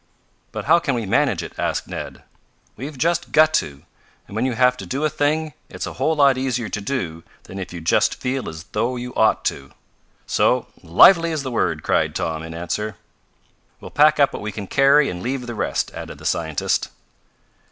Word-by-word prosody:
"But -, -, -5 dB
how 165 Hz, +3 st, +5 dB
can 140 Hz, -6 st, -1 dB
we 115 Hz, -2 st, -2 dB
manage 95 Hz, -, +1 dB
it?" -, -, -8 dB
asked -, -, -1 dB
Ned. -, -, -7 dB, 0.5 s
"We've 140 Hz, +4 st, -7 dB
just 170 Hz, +5 st, 0 dB
got 155 Hz, 0 st, +5 dB
to! 70 Hz, -1 st, -11 dB, 0.4 s
And 100 Hz, -, -11 dB
when 120 Hz, +4 st, +1 dB
you 130 Hz, -, -1 dB
have 125 Hz, +1 st, +3 dB
to -, -, -8 dB
do 140 Hz, +4 st, -1 dB
a 155 Hz, -, +1 dB
thing, 155 Hz, +1 st, 0 dB, 0.2 s
it's -, -, -5 dB
a -, -, -6 dB
whole 160 Hz, -, +2 dB
lot 140 Hz, -3 st, +4 dB
easier 125 Hz, -4 st, -2 dB
to 105 Hz, -, -4 dB
do 95 Hz, -9 st, -3 dB, 0.2 s
than 95 Hz, -, -9 dB
if 90 Hz, -1 st, -6 dB
you 90 Hz, -1 st, -7 dB
just 80 Hz, -, +2 dB
feel 130 Hz, 0 st, -3 dB
as 80 Hz, 0 st, -8 dB
though 115 Hz, +4 st, -1 dB
you 125 Hz, 0 st, -6 dB
ought 110 Hz, -, +2 dB
to. 70 Hz, -1 st, -3 dB, 0.5 s
So, -, -, +2 dB, 0.2 s
lively 165 Hz, -, +6 dB
is 155 Hz, -3 st, -2 dB
the 130 Hz, -, -4 dB
word!" 85 Hz, -9 st, 0 dB
cried -, -, +1 dB
Tom, 80 Hz, -1 st, -2 dB
in 80 Hz, 0 st, -8 dB
answer. 95 Hz, +5 st, -3 dB, 0.8 s
"We'll -, -, -10 dB
pack 150 Hz, +1 st, +4 dB
up 140 Hz, -, +4 dB
what -, -, -5 dB
we 105 Hz, +1 st, -4 dB
can 105 Hz, -1 st, -6 dB
carry 140 Hz, +6 st, +4 dB
and 90 Hz, 0 st, -5 dB
leave 125 Hz, +3 st, -3 dB
the 120 Hz, -, -5 dB
rest," 110 Hz, -, -2 dB
added -, -, -8 dB
the -, -, -13 dB
scientist. 80 Hz, -3 st, 0 dB
125 Hz, 205 wpm, -21 LUFS, 95-145 Hz, 0.8 s, lively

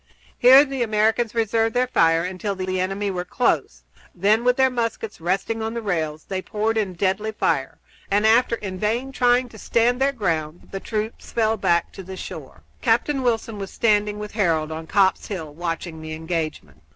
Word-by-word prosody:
Here 265 Hz, +4 st, +8 dB
the 270 Hz, -2 st, -4 dB
Americans 220 Hz, +1 st, +1 dB
reserved 225 Hz, +1 st, +1 dB
their 250 Hz, +1 st, +3 dB
fire 165 Hz, -9 st, +3 dB
until 185 Hz, +2 st, -3 dB
the 185 Hz, 0 st, -2 dB
enemy 195 Hz, +2 st, -1 dB
were 180 Hz, -1 st, -3 dB
close; 235 Hz, +7 st, -1 dB, 0.3 s
then, 210 Hz, +5 st, +3 dB
with 250 Hz, 0 st, +3 dB
their 265 Hz, -1 st, +4 dB
muskets 230 Hz, -5 st, -3 dB
resting 195 Hz, +6 st, -1 dB
on 225 Hz, +1 st, -3 dB
the 235 Hz, -, -2 dB
rails, 155 Hz, -6 st, -2 dB
they 190 Hz, -1 st, -4 dB
poured 215 Hz, +3 st, -1 dB
in 215 Hz, -3 st, 0 dB
a -, -, -9 dB
deadly 195 Hz, +4 st, 0 dB
fire, 215 Hz, -, -1 dB, 0.3 s
and, 205 Hz, +2 st, +2 dB
after 230 Hz, +2 st, +4 dB
in 190 Hz, -4 st, -6 dB
vain 235 Hz, +6 st, -1 dB
trying 250 Hz, -1 st, +3 dB
to 220 Hz, -, -13 dB
stand 240 Hz, +4 st, +1 dB
their 275 Hz, +1 st, +3 dB
ground, 165 Hz, -, -3 dB
the 195 Hz, -, -4 dB
troops 215 Hz, +2 st, -4 dB
fell 220 Hz, -1 st, +1 dB
back 170 Hz, -5 st, +1 dB
to -, -, -9 dB
the 190 Hz, 0 st, -9 dB
shore. -, -, -9 dB, 0.2 s
Captain 290 Hz, -3 st, +1 dB
Wilson 230 Hz, -3 st, -1 dB
was 195 Hz, -1 st, -5 dB
standing 210 Hz, -2 st, +1 dB
with 210 Hz, 0 st, -6 dB
Harold 165 Hz, -7 st, 0 dB
on 160 Hz, +1 st, -6 dB
Copp's 190 Hz, +1 st, +2 dB
Hill 160 Hz, -7 st, -6 dB
watching 165 Hz, 0 st, -4 dB
the 155 Hz, 0 st, -6 dB
engagement. 155 Hz, -, -4 dB
210 Hz, 190 wpm, -23 LUFS, 180-230 Hz, 0.3 s, Here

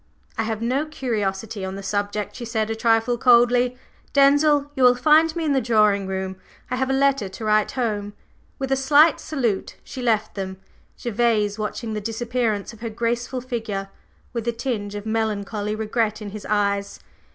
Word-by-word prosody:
"I 225 Hz, -, -1 dB
have 220 Hz, 0 st, -3 dB
no 265 Hz, +6 st, 0 dB
curiosity 215 Hz, -7 st, -3 dB
on 190 Hz, 0 st, -4 dB
the 195 Hz, -, -7 dB
subject," 205 Hz, +1 st, -2 dB
she 250 Hz, -, -7 dB
said 225 Hz, -2 st, -1 dB
a -, -, -1 dB
trifle 225 Hz, +1 st, +2 dB
coldly. 245 Hz, 0 st, +4 dB, 0.4 s
"Denzil, 290 Hz, +1 st, +4 dB
you 265 Hz, -, -2 dB
will 250 Hz, -1 st, +7 dB
find 315 Hz, +5 st, +4 dB
me 335 Hz, -1 st, -2 dB
in 295 Hz, -, +2 dB
the 265 Hz, -, +2 dB
drawing 210 Hz, -4 st, +3 dB
room. 190 Hz, 0 st, -3 dB, 0.3 s
I 250 Hz, -, 0 dB
have 265 Hz, 0 st, 0 dB
a -, -, +1 dB
letter 275 Hz, -6 st, +2 dB
to 220 Hz, +4 st, -7 dB
write 215 Hz, 0 st, +2 dB
home." 210 Hz, -5 st, -2 dB, 0.4 s
With 270 Hz, -1 st, -4 dB
a -, -, +4 dB
slight 290 Hz, +4 st, +5 dB
salute 240 Hz, -10 st, -2 dB
she 260 Hz, -, -8 dB
left 220 Hz, -3 st, +1 dB
them, 190 Hz, -1 st, -5 dB, 0.4 s
Gervase 220 Hz, -3 st, +1 dB
watching 220 Hz, +1 st, -3 dB
the 210 Hz, -, -3 dB
disappearance 225 Hz, -1 st, -2 dB
of 225 Hz, -, -14 dB
her 230 Hz, 0 st, -4 dB
graceful 235 Hz, +3 st, -2 dB
figure 225 Hz, -6 st, -4 dB, 0.4 s
with 235 Hz, -1 st, -4 dB
a 235 Hz, -, +1 dB
tinge 225 Hz, -4 st, -3 dB
of 205 Hz, 0 st, -6 dB
melancholy 215 Hz, -1 st, -2 dB
regret 220 Hz, 0 st, -1 dB
in 210 Hz, -2 st, -7 dB
his 215 Hz, 0 st, -8 dB
eyes. 200 Hz, -1 st, 0 dB
225 Hz, 180 wpm, -23 LUFS, 210-250 Hz, 0.4 s, will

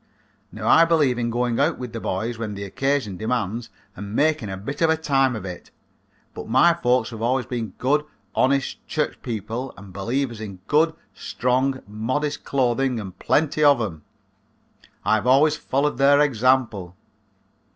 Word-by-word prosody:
Now -, -, -5 dB
I 165 Hz, -, +7 dB
believe 150 Hz, -7 st, +2 dB
in 120 Hz, 0 st, -1 dB
going 120 Hz, 0 st, 0 dB
out 150 Hz, +4 st, +2 dB
with 125 Hz, -2 st, -7 dB
the 115 Hz, -, -4 dB
boys 110 Hz, +4 st, -3 dB
when 105 Hz, -3 st, -4 dB
the 100 Hz, -, -6 dB
occasion 130 Hz, -1 st, -1 dB
demands 115 Hz, 0 st, -2 dB, 0.3 s
and 100 Hz, +2 st, -7 dB
making 150 Hz, -7 st, +1 dB
a 95 Hz, -, -5 dB
bit 125 Hz, -, -6 dB
of 165 Hz, -, +4 dB
a 160 Hz, -, +3 dB
time 135 Hz, -5 st, +1 dB
of 100 Hz, -3 st, -6 dB
it, 90 Hz, -2 st, -8 dB, 0.6 s
but -, -, -8 dB
my 130 Hz, +9 st, +5 dB
folks 125 Hz, -7 st, +1 dB
have 110 Hz, -1 st, -8 dB
always 125 Hz, +1 st, +1 dB
been 115 Hz, -5 st, -5 dB
good, 145 Hz, +4 st, +1 dB, 0.3 s
honest 135 Hz, +1 st, +1 dB
church -, -, -2 dB
people 115 Hz, +3 st, -4 dB
and 100 Hz, -2 st, -12 dB
believers 115 Hz, +4 st, -2 dB
in 100 Hz, -3 st, -6 dB
good, 160 Hz, +2 st, +2 dB, 0.2 s
strong, 130 Hz, +2 st, -1 dB
modest 130 Hz, +8 st, -2 dB
clothing 130 Hz, -1 st, 0 dB
and 95 Hz, -3 st, -8 dB
plenty 155 Hz, 0 st, +1 dB
of 145 Hz, -3 st, +6 dB
'em. 90 Hz, -9 st, -4 dB, 1.0 s
I -, -, +3 dB
have 110 Hz, +2 st, +1 dB
always 145 Hz, +4 st, +5 dB
followed 140 Hz, -2 st, -1 dB
their 140 Hz, +1 st, +5 dB
example." 120 Hz, -9 st, +1 dB
125 Hz, 165 wpm, -23 LUFS, 110-140 Hz, 1.0 s, I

